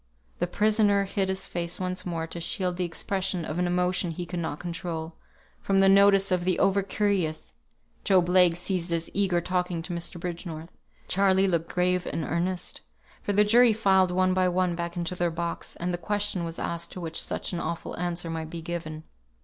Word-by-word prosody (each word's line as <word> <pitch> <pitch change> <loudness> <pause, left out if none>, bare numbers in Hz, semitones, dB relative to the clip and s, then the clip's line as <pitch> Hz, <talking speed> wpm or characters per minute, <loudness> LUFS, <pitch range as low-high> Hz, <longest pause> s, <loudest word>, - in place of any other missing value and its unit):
The 175 - 0
prisoner 210 +1 +3
hid 195 -1 -1
his 190 0 -1
face 170 0 -3
once 185 0 -3
more 165 -2 -2
to 170 +1 -7
shield 180 -2 -1
the 185 - 0
expression 185 0 -2
of 155 +3 -3
an 180 - +1
emotion 180 0 +1
he 175 +2 -4
could 175 +1 -4
not 160 -3 -3
control, 165 -2 -5 0.5
from 195 - +1
the 195 0 +5
notice 195 0 +5
of 180 -1 +1
the 180 -1 +1
over 195 0 +3
curious; 195 -5 -1 0.5
Job 185 -4 +4
Legh 180 -2 +5
ceased 180 -1 -2
his 170 -1 -2
eager 190 -3 +2
talking 180 -1 -1
to 180 - -5
Mr. 170 +1 -4
Bridgenorth; 170 -1 -6 0.4
Charley 195 0 +3
looked 170 -3 -1
grave 180 0 +1
and 165 - -2
earnest; 175 +4 -2 0.4
for - - -2
the 205 +1 +5
jury 230 +2 +6
filed 190 -4 +3
one 185 +1 +2
by 185 0 +2
one 180 0 +1
back 170 +1 -4
into 170 0 -2
their 175 -1 0
box, 170 +1 -4
and 175 +1 -2
the 175 - -2
question 205 -1 -1
was 165 0 -5
asked 170 0 -3
to - - -7
which 165 -2 -2
such - - -3
an 175 - -2
awful 170 0 -4
answer 175 -1 -2
might 160 -1 -4
be 165 0 -7
given. 160 -2 -5
180 Hz, 200 wpm, -27 LUFS, 170-190 Hz, 0.5 s, jury